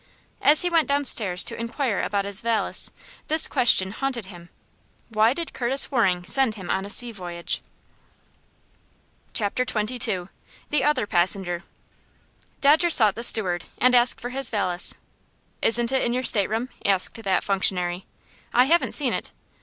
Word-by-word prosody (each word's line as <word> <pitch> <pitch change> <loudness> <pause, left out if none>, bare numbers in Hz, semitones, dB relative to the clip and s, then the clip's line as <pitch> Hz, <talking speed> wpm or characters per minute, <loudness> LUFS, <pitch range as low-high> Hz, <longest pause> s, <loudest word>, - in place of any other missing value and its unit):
As 300 +3 +6
he 355 - 0
went 330 -2 +2
downstairs 230 -10 +1
to - - -3
inquire 230 -1 -3
about 200 -1 -2
his 200 0 -2
valise, 230 -1 -2 0.4
this 315 +1 +2
question 235 -8 +3
haunted 250 -1 -4
him: 175 -3 -13 0.6
"Why 220 +1 +2
did 330 +5 -5
Curtis 265 +4 0
Waring 190 -9 0
send 260 0 +3
him 190 -4 -7
on 190 +1 -2
a - - -9
sea 240 +3 0
voyage?" 175 -4 -4 1.7
Chapter 220 +2 0
XXII. 215 -5 -1 0.4
The 295 -3 +1
Other 290 -6 +1
Passenger. 175 -1 0 1.0
Dodger 310 +5 +4
sought 220 - +5
the 230 - -7
steward, 185 -7 +2
and 255 0 +3
asked 245 0 +3
for 245 - -6
his 270 -1 -2
valise. 180 -4 -2 0.7
"Isn't 235 +1 +3
it 265 - +1
in 240 - -1
your 255 +1 -2
stateroom?" 225 +2 0
asked 195 +3 +3
that 195 -3 -1
functionary. 185 -2 -2 0.5
"I 250 - +6
haven't 335 +5 +1
seen - - +3
it." - - -5
225 Hz, 150 wpm, -23 LUFS, 190-255 Hz, 1.7 s, As